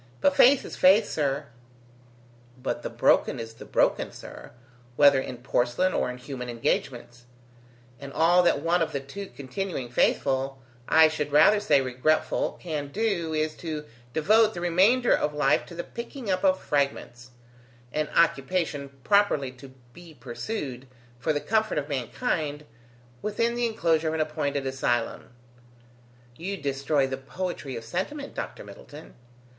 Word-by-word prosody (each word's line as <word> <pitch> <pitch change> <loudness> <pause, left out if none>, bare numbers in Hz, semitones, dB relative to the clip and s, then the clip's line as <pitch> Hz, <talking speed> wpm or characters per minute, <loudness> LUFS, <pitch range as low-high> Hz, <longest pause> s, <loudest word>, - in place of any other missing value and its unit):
"But 185 +8 +3
faith 260 +7 +6
is - - -7
faith, 200 +4 +5
sir." 140 -2 -1 1.1
"But 130 +1 -3
the - - -4
broken - - +2
is 115 0 -7
the 115 - -12
broken, - - +1
sir, - - -11 0.5
whether 140 -1 +6
in 130 -1 -6
porcelain 125 +8 0
or - - 0
in 125 - -6
human 125 -1 -7
engagements; 120 +1 -3 0.7
and 140 0 -8
all 170 +4 +4
that 170 -5 +2
one 170 +1 +2
of 160 -1 -1
the 140 - -1
two 195 +9 -8
continuing 135 -2 -5
faithful, 135 +2 +1 0.3
I 160 0 +7
should 150 -2 -3
rather 155 +8 +6
say, 145 -9 +3
regretful, 130 +4 0
can 155 -5 -4
do, 175 -3 -1
is 155 0 0
to 155 -3 -5 0.3
devote 215 - +3
the 175 - -5
remainder 195 +9 +4
of 150 0 -2
life 150 - +2
to 170 - -10
the 175 - -4
picking 235 -2 -6
up 185 0 -1
of 185 -1 +4
the - - -18
fragments; 140 -3 -2 0.6
an 155 0 -1
occupation 155 -2 +1
properly 200 -10 +2
to 130 +1 -13 0.3
be 170 -1 -14
pursued, 130 - -6 0.3
for 155 - 0
the 145 - 0
comfort 220 +3 0
of 145 -1 -1
mankind, 145 - -2 0.6
within 230 +3 0
the 240 0 0
enclosure 165 -7 +1
of 155 - -1
an - - -2
appointed 145 -3 -2
asylum." 120 -3 -1 1.1
"You 195 +8 -4
destroy 140 -1 0
the 135 0 -4
poetry 140 0 -5
of 115 - -6
sentiment, 195 - -4
Dr. - - -6
Middleton." 150 +2 -12
150 Hz, 150 wpm, -26 LUFS, 135-185 Hz, 1.1 s, I